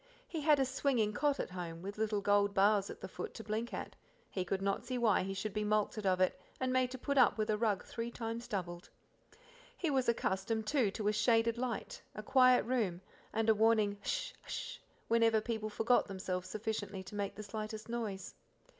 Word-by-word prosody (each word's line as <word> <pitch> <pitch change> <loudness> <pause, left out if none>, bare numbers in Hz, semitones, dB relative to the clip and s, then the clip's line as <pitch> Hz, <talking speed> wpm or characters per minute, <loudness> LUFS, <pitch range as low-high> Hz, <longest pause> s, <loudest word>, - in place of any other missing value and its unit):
He 320 - -4
had 295 -1 +5
a 270 - +3
swinging 255 -5 +1
cot 285 +4 +1
at - - -3
home; 170 -2 -6
with 200 +2 -6
little 215 -2 0
gold 205 0 +3
bars 200 0 +4
at - - -8
the - - -5
foot - - -6
to 225 - -7
blink 220 +2 -2
at - - -5 0.4
he 185 - -1
could 190 +2 -1
not 195 0 0
see 255 0 -3
why 225 -5 +3
he 195 +1 -3
should 195 +1 -3
be 210 0 -1
mulcted 210 0 0
of 185 -1 +3
it, 185 - +1 0.2
and 255 0 0
made 255 -1 +3
to 260 - -6
put 280 +2 +1
up 245 - +5
with 215 0 +1
a 210 - +1
rug 215 -4 +1
three 230 0 -4
times 230 0 -5
doubled. 175 -3 -4 0.9
He 335 -4 0
was 260 -3 +2
accustomed, 220 0 0
too, 250 -3 +2
to 205 +1 -3
a 210 - +3
shaded 225 +2 +3
light, 250 -2 -3
a 215 - -6
quiet 255 0 +5
room, 220 -8 0 0.3
and 225 0 0
a 220 - +7
warning 215 -2 +3
H'sh! - - -2
h'sh! - - -5 0.3
whenever 230 -1 +4
people 220 -1 -3
forgot 225 +3 +2
themselves 185 -2 -4
sufficiently 210 -2 -3
to 190 - -11
make 200 -1 -3
the 215 - -7
slightest 215 +1 -5
noise. 225 -5 -4
215 Hz, 210 wpm, -34 LUFS, 200-235 Hz, 0.9 s, a